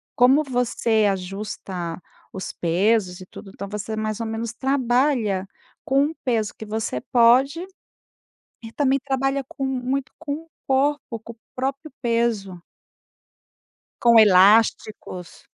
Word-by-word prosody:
como 265 +5 +5
você 240 -4 +1
ajusta 185 -2 -5 0.3
os 190 -1 -5
pesos 185 +2 +1
e - - -9
tudo, 195 +2 -12
então, 200 - -7
você 210 +1 -4
mais 215 0 -3
ou 230 - -3
menos 225 +1 -4
trabalha 250 -6 +1 0.4
com 275 +2 +3
o 320 - -7
peso 225 -4 0
que 220 - -8
você 215 - -3
pode, 260 +8 +4 1.0
e 225 - -9
também 275 0 +2
trabalha 270 0 -1
com 275 - -5
muito 265 +1 -2
com 295 -3 -4
o 325 +2 -9 0.2
corpo, 270 -3 0
com 230 - -10
o - - -41 0.2
próprio 275 +4 -3
peso. 230 -6 -1 1.4
Com 235 -1 +6
elásticos. 205 -2 +3
230 Hz, 125 wpm, -23 LUFS, 205-265 Hz, 1.4 s, Com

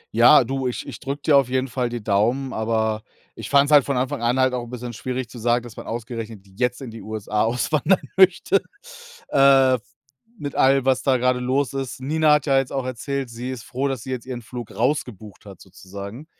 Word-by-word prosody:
Ja, 125 +3 +7
du, 135 +1 -2
ich 125 - -4
ich - - -8
drücke 140 0 -5
dir 145 -3 +5
auf 135 -3 +2
jeden 130 +1 0
Fall 125 -1 -2
die 120 -3 -6
Daumen, 120 +7 0
aber 110 -1 -1 0.3
ich - - -8
fand's 140 +1 +4
halt 145 -2 +7
von 140 -1 -2
Anfang 125 -2 -2
an 120 +3 +1
halt 130 -1 +3
auch 125 -1 -2
'n 120 - -10
bisschen 125 -1 -6
schwierig 130 +2 -4
zu 120 0 -11
sagen, 120 +1 +1
dass 120 -2 -11
man - - -9
ausgerechnet 115 -2 -6
jetzt 125 +7 -2
in 120 - -7
die 115 - -10
USA 105 -1 -3
auswandern 145 +9 +1 0.2
möchte, 190 +1 +4 0.7
äh, 135 -2 +5 0.6
mit 145 -4 -5
allem, 135 0 +3
was 130 -1 +2
da 130 -2 +2
grade 125 0 +1
los 130 +2 0
ist. 135 -2 -4
Nina 155 +3 +2
hat 150 0 +2
ja 135 -2 +3
jetzt 135 - -3
auch 135 -2 -2
erzählt, 130 +1 -4
sie 120 +2 -6
ist 130 -3 -6
froh, 135 +2 -2
dass 130 -5 -4
sie 130 - -6
jetzt 125 0 -5
ihren 120 -2 -6
Flug 120 0 -8
rausgebucht 115 -6 -2
hat 95 -3 -12
sozusagen. 100 - -10
125 Hz, 215 wpm, -22 LUFS, 115-135 Hz, 0.7 s, Ja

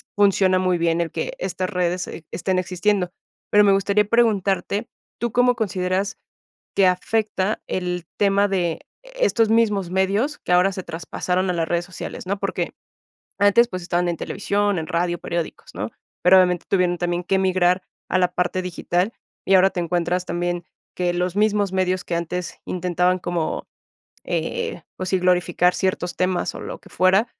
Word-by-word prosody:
funciona 195 -2 +4
muy 185 -1 +1
bien 170 0 +1
el 170 - -2
que - - -3
estas 185 - -2
redes 180 -1 -1
e 165 - -9
estén 185 +2 -1
existiendo. 185 0 0 0.4
Pero 210 0 +6
me 200 - +5
gustaría 200 +1 +3
preguntarte, 210 -1 +1 0.3
¿tú 235 -2 0
cómo 245 0 +3
consideras 190 -2 -1 0.6
que 195 -2 +5
afecta 205 +2 0
el 180 -1 -2
tema 200 0 +3
de 180 -4 -1 0.2
estos - - +1
mismos 210 -5 +2
medios 200 +10 +1
que - - -3
ahora 180 +2 +5
se 185 - -5
traspasaron 180 +3 -2
a - - +2
las 165 -1 0
redes 175 0 0
sociales, 185 0 -7
no?, 200 +2 -1
porque - - -2 0.7
antes, 205 +4 +5
pues, 185 -4 -5
estaban 175 0 0
en 170 - -1
televisión, 205 -1 0
en 160 - -3
radio, 175 0 0
periódicos, 170 -1 -4
¿no?, - - -3 0.3
pero 185 +2 +7
obviamente 180 -2 +3
tuvieron 180 -2 +2
también 175 0 -1
que 190 +1 +1
migrar 185 -1 +2 0.3
a 185 - +3
la 180 -1 +3
parte 180 +1 0
digital 180 +3 -1 0.3
y 195 - +4
ahora 190 +1 +6
te 180 - -3
encuentras 175 +1 -1
también 175 0 -2 0.3
que 180 -1 +1
los 180 +1 -1
mismos 205 -2 +2
medios 185 -1 0
que 170 - -2
antes 170 +1 -4
intentaban 180 0 +1
como, 175 -3 -2 0.6
eh 470 0 -2
pues, 185 - -4
sí, 190 - +2
glorificar 180 0 +2
ciertos 180 -2 -1
temas 185 -1 0
o - - -7
lo - - -6
que - - -18
fuera, 190 +5 +3
185 Hz, 170 wpm, -22 LUFS, 180-200 Hz, 0.7 s, pero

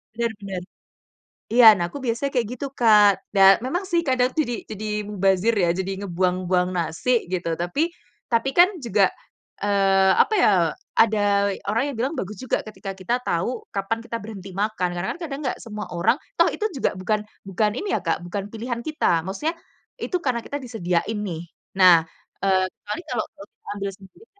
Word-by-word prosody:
bener 235 0 0
bener. 195 -2 -5 0.9
Iya 240 -1 +7
nah 170 - 0
aku 285 - -7
biasanya 235 +5 -1
kayak 235 -4 +1
gitu 280 - -3
Kak 210 -3 +7 0.3
dan 195 0 +8
memang 350 +8 -2
sih 345 -2 +2
kadang 255 0 +3
jadi 265 -7 0 0.2
jadi 215 0 -5 0.2
mubazir 195 +2 +2
ya, 175 -3 +3
jadi 190 +1 -2
ngebuang-buang 180 0 0
nasi 165 +8 -2 0.2
gitu, 175 -2 -1
tapi 280 - 0 0.4
tapi 230 +4 +2
kan 355 +2 +9 0.2
juga, 210 -3 +2 0.6
eee, 195 -1 +4
apa 435 - -1
ya, - - +6 0.5
ada 220 -1 +4 0.5
orang 230 +3 +1
yang - - -8
bilang 260 +6 0
bagus 205 +3 -4
juga 255 - 0
ketika 195 -2 -7
kita 185 +6 -1
tahu 185 +9 -1
kapan 195 +3 -1
kita 230 - -4
berhenti 200 -3 -8
makan. 205 -3 0
Karena 175 +2 -3
kan - - -21
kadang 280 -2 -5
nggak - - -2
semua 210 -2 -6
orang 225 +9 +3 0.2
toh - - +5
itu 430 - -1
juga - - +1
bukan 210 +3 0 0.3
bukan 210 +2 +1
ini 405 - -4
ya - - -3
Kak, 165 - +1
bukan 195 +2 -4
pilihan 235 +1 -4
kita, 175 - +1
maksudnya 295 - -2 0.5
itu 365 - -1
karena 250 -3 0
kita 285 - -4
disediain 215 -3 -1
nih. 165 -3 -4 0.4
Nah, 175 -3 +8 0.4
eee, 190 -1 +3
kecuali 210 +11 -6
kalau, 235 -3 -1 0.2
eee, 200 - -17
ambil 200 0 -2
sendiri 200 - -18
210 Hz, 175 wpm, -23 LUFS, 190-240 Hz, 0.9 s, kan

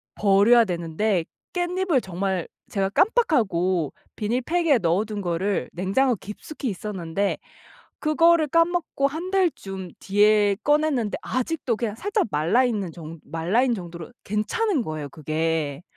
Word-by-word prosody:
버려야 210 +4 +5
되는데 175 +1 -1 0.3
깻잎을 355 -4 0
정말 190 -1 -2 0.2
제가 195 -1 0
깜빡하고 195 - +2 0.2
비닐팩에 260 +7 +1
넣어 180 +3 +1
둔 210 -1 -5
거를 185 +2 -1
냉장고 215 +8 +1
깊숙이 215 +8 -7
있었는데 195 -1 -2 0.6
그거를 330 +1 +4
까먹고 330 -2 +1
1 325 +6 -5
달쯤 195 - -1
뒤에 205 0 +3
꺼냈는데 295 -7 +1
아직도 255 -1 -2
그냥 215 -1 -3
살짝 410 - 0
말라있는 200 +4 +1
정 165 -1 -9
말라있는 215 +10 +1
정도로 175 +1 -8
괜찮은 270 - 0
거예요, 155 -6 -5
그게. 155 0 -2
210 Hz, 290 characters per minute, -24 LUFS, 180-295 Hz, 0.6 s, 버려야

